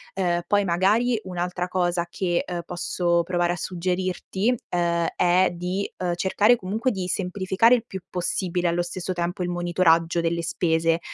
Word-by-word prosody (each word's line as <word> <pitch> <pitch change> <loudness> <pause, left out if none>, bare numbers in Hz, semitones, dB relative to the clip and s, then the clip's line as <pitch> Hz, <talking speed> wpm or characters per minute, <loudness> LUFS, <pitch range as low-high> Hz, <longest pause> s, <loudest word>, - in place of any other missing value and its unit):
Uhm, 175 -2 0
poi 205 -1 +2
magari 210 +7 +2
un'altra 180 0 -3
cosa 175 -1 0
che, 175 -2 -1
uhm, 175 -1 -4
posso 175 0 0
provare 175 0 0
a - - -3
suggerirti, 185 +5 -1 0.2
uhm, 170 -1 +1
è 180 +1 +3
di, 180 +3 -3
uhm, 175 -1 -1
cercare 205 +6 +3
comunque 220 +6 -1
di 190 -4 -3
semplificare 190 +5 +2
il 235 -2 -3
più 190 -3 -7
possibile 180 0 -1
allo 170 +1 +1
stesso 180 +1 -4
tempo 175 +1 -3
il 175 - -2
monitoraggio 175 -1 +2
delle 170 0 0
spese, 165 -1 +1
180 Hz, 155 wpm, -24 LUFS, 175-190 Hz, 0.2 s, è